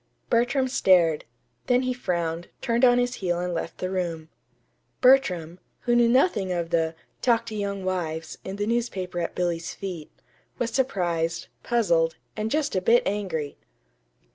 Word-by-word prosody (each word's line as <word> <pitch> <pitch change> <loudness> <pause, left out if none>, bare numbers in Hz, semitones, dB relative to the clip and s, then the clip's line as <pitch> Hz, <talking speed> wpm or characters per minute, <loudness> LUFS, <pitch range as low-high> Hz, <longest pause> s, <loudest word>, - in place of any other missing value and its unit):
Bertram 245 +3 +2
stared; 180 - +3 0.4
then 250 +1 +3
he 255 0 0
frowned, 170 -7 -2
turned 235 +1 0
on 245 -1 +6
his 245 0 +1
heel 175 -2 0
and 180 0 -2
left 165 0 -4
the 185 0 -3
room. 170 -4 -3 0.7
Bertram, 185 -11 +3 0.2
who 240 - +1
knew 240 -1 +5
nothing 235 - +2
of 170 -1 -2
the 165 -1 +1 0.3
"Talk 230 -2 +2
to 215 - -6
Young 200 -2 -3
Wives" 165 -4 -3
in 190 - -5
the 205 0 -2
newspaper 205 -6 -2
at 170 - -3
Billy's 170 -2 -2
feet, 180 -6 -6 0.5
was 235 -1 -1
surprised, 175 -11 -1
puzzled, 170 -9 +2 0.2
and 215 0 -2
just 300 -1 0
a 185 - +1
bit 230 +6 +4
angry. 185 -8 -3
190 Hz, 155 wpm, -25 LUFS, 170-240 Hz, 0.7 s, on